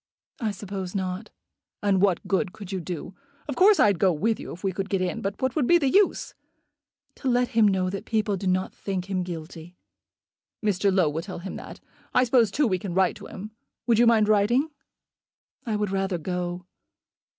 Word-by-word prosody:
"I 225 -5 0
suppose 195 -2 -6
not." 190 +2 -3 0.5
"And 195 -2 +3
what 195 -4 +2
good 190 -1 0
could 200 -3 -9
you 190 - -2
do? 175 +1 -6 0.3
Of 285 - -3
course 395 +2 +6
I'd 200 -5 +4
go 190 0 +4
with 215 +8 0
you - - -7
if 180 - -10
we 195 - +1
could 195 +2 -3
get 195 - +1
in; 185 -1 -2
but 195 +1 -3
what 260 -1 -1
would 290 -6 +1
be 345 - +6
the 275 -6 +1
use?" 405 -1 +2 0.8
"To 270 - -5
let 245 0 +2
him 225 -4 +4
know 190 -2 +1
that 195 - -5
people 215 -2 0
do 190 0 -4
not 185 +1 0
think 195 -1 -4
him 185 -1 0
guilty." 170 0 -7 0.9
"Mr. 200 -1 +2
Low 185 -4 +3
will 150 +2 -2
tell 185 +1 -7
him 185 +2 -6
that. - - -10 0.4
I 250 - +6
suppose, 235 -3 +4
too, 285 +9 +1
we 185 -6 +1
can 175 -2 -5
write 190 -1 +3
to - - -10
him. 210 +3 -8 0.3
Would 230 -2 +3
you 240 - +6
mind 220 -2 +5
writing?" 225 +9 +3 1.0
"I 220 - 0
would 210 -2 -1
rather 195 -2 0
go." 180 +1 -4
195 Hz, 205 wpm, -25 LUFS, 185-220 Hz, 1.0 s, course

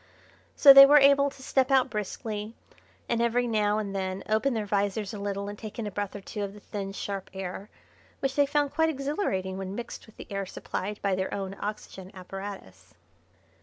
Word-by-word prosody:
So 280 -2 +9
they 275 0 +11
were 295 +1 +7
able 280 0 +5
to 270 -1 -14
step 260 0 +1
out 265 -2 +3
briskly, 210 +1 -4 0.5
and 235 0 0
every 235 +1 +2
now 210 -2 +1
and 200 -2 -3
then 190 0 -3
open 220 +4 +1
their 215 -2 -2
visors 200 +1 -1
a 210 - -6
little 200 0 -3
and 205 0 -7
take 215 -2 -8
in 230 - -3
a 205 - -4
breath 205 0 -4
or 200 - -6
two 210 +2 -6
of 200 0 -4
the - - -11
thin, 195 -1 -6
sharp 195 -1 -5
air, 190 +2 -6 0.5
which 270 -1 -1
they 285 -1 +3
found 290 -1 +1
quite 320 +1 +2
exhilarating 275 - -2
when 190 0 -5
mixed 240 0 -7
with 220 - -19
the - - -9
air 195 -1 -3
supplied 205 +3 -5
by 200 -1 +1
their 190 0 -2
own 195 -1 -4
oxygen 200 -2 -6
apparatus. 190 - -9
210 Hz, 205 wpm, -27 LUFS, 195-245 Hz, 0.5 s, they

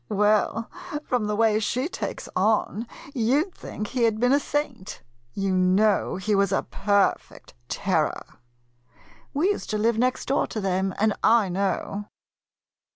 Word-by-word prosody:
Well, 210 +2 +2 0.4
from 245 -7 -1
the 210 - -1
way 215 -1 +3
she 250 +6 -1
takes - - -5
on, 215 +3 +1 0.3
you 260 +6 +2
'd 380 - -19
think 210 - -6
he 255 - -2
had 225 -2 +2
been 245 +2 +3
a 285 - +5
saint. 280 -9 -4 0.3
You 195 -1 0
know 190 +3 +3
he 200 +3 -1
was 200 -1 +2
a 195 - +1
perfect 200 0 0 0.2
terror. - - 0 1.1
We 315 +7 +1
used 410 - -2
to 215 - 0
live 225 +1 +1
next 255 +1 +1
door 275 - +2
to 220 - -4
them, 190 -1 -1
and 215 0 +2
I 225 -4 +4
know. 195 +2 -2
215 Hz, 155 wpm, -25 LUFS, 200-240 Hz, 1.1 s, a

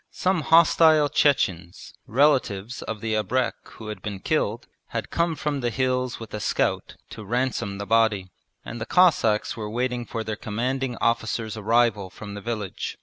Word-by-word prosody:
Some 185 -2 0
hostile 160 -1 +5
Chechens, 95 - 0
relatives 125 -5 +1
of 110 -2 -5
the 110 -1 -2
abrek 125 +4 0 0.2
who 110 -1 -9
had 105 -3 -6
been 100 -1 -5
killed, 120 -2 -1 0.2
had - - -5
come 170 -1 +1
from 150 -2 -2
the 120 -2 0
hills 130 0 -1
with 115 -2 -10
a 105 - -3
scout - - -1 0.2
to 110 - -8
ransom 120 -3 -1
the 100 - -5
body; 110 -4 +2 0.3
and 120 - -7
the 110 - -4
Cossacks 145 -13 +3
were 110 -2 -5
waiting 125 +1 -2
for 115 -2 -4
their 110 -1 -3
Commanding 125 +4 -2
Officer's 110 -1 -1
arrival 110 -2 +1
from 100 +2 -9
the 100 - -7
village. 105 -3 -4
115 Hz, 165 wpm, -24 LUFS, 105-130 Hz, 0.3 s, hostile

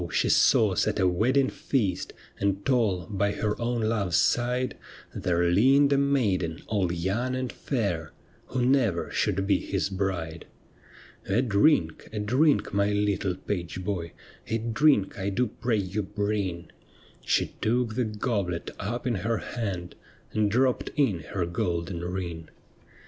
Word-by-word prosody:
she - - +1
saw 105 -4 +4
set 105 +3 0
a 95 - +4
wedding 130 +10 +2
feast, 105 -12 -1 0.3
And 100 0 0
tall 110 -10 +1
by 100 -1 0
her 105 -1 -1
own 120 0 0
love's 105 -5 0
side 125 +1 +1 0.4
There 85 -1 0
leaned 135 +11 +4
a - - +3
maiden 100 -13 0
all 100 -5 0
young 100 +9 -1
and 130 -1 -3
fair 90 - -2 0.4
Who 125 -1 -1
never 130 -4 +2
should 95 - 0
be 100 - +3
his 100 0 -2
bride. 90 -4 -3 0.4
' - - -22
A 110 +6 +2
drink, 100 - +2
a 110 - -6
drink, 130 +6 +2
my 100 +1 +2
little 100 -2 0
page 90 -1 -4
boy, 90 -4 -3 0.3
A 115 - 0
drink 115 -1 +2
1 100 0 -2
do 125 - +2
pray 115 0 -1
you 100 +1 -2
bring 100 -4 -3 0.2
'; - - -28
She - - +1
took 120 0 +1
the 125 +1 0
goblet 105 -5 -2
up 120 +5 -3
in 125 - +1
her 115 +3 -1
hand 95 -8 -4 0.4
And 105 -1 +1
dropped 125 +4 +1
in 135 - +2
her 90 +1 -3
golden 85 0 -2
ring. 85 -3 -5
105 Hz, 150 wpm, -27 LUFS, 90-120 Hz, 0.4 s, saw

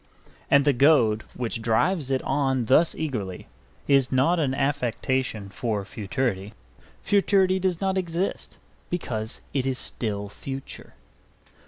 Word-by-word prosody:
And 140 0 +5
the 145 - +4
goad 120 -6 +4
which 115 -2 -3
drives 135 +7 +1
it 130 -1 0
on 135 -3 0
thus 155 +8 +4
eagerly 110 - -4 0.4
is 135 -2 +3
not 140 +7 +3
an 135 -4 0
affectation 130 -5 -1
for 100 0 -2
futurity 105 -1 -3 0.5
Futurity 195 -2 +3
does 185 -2 0
not 190 -1 +1
exist, 175 +1 -3 0.3
because 115 -10 -4
it 135 -1 0
is 130 -1 0
still 105 -5 -3
future. 135 +6 -8
135 Hz, 125 wpm, -25 LUFS, 110-155 Hz, 0.5 s, And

